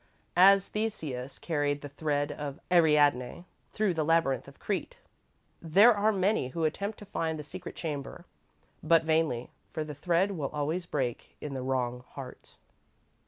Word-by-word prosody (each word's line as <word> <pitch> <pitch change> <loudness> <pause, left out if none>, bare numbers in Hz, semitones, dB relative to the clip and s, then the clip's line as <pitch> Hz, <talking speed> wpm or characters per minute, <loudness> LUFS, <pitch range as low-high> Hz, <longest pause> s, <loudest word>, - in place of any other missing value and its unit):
As 195 +2 +7
Theseus 155 - -4
carried 145 -3 -1
the 145 - -6
thread 145 0 -1
of 145 0 -6
Ariadne 150 -3 +3 0.3
through 210 -4 +1
the 160 -2 0
labyrinth 160 -4 +2
of 140 - -14
Crete, 215 - -3 0.6
there 200 +9 +6
are 210 +1 +2
many 195 -7 +1
who 165 +5 -4
attempt 200 +7 -1
to 205 - -11
find 165 -5 -2
the 150 - -6
secret 180 +4 -8
chamber, 145 -4 -5 0.6
but 165 -1 +4
vainly, 160 -7 0 0.2
for 155 - -2
the 150 -1 -7
thread 175 +6 +1
will 155 -8 -3
always 155 +4 -2
break 125 -7 -3
in 150 - -6
the 130 - -4
wrong 125 -1 -1
heart. 135 -2 -10
155 Hz, 155 wpm, -29 LUFS, 140-180 Hz, 0.6 s, As